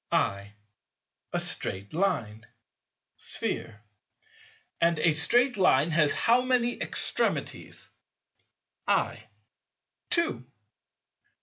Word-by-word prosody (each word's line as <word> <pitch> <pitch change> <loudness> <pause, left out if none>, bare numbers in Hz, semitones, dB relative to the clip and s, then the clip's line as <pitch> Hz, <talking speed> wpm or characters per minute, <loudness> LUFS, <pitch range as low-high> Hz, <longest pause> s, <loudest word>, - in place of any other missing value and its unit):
I. 100 +1 -1 0.8
A - - -1
straight 100 +2 -1
Line. 115 - -2 0.7
Sphere. 110 -1 -3 1.0
And 170 0 +2
a 165 -1 +2
straight 245 - +2
Line 160 -4 +3
has 155 -2 +2
how 240 +2 +3
many 250 -1 0
extremities? - - -1 1.0
I. - - -1 0.8
Two. 340 - 0
165 Hz, 80 wpm, -27 LUFS, -, 1.0 s, Line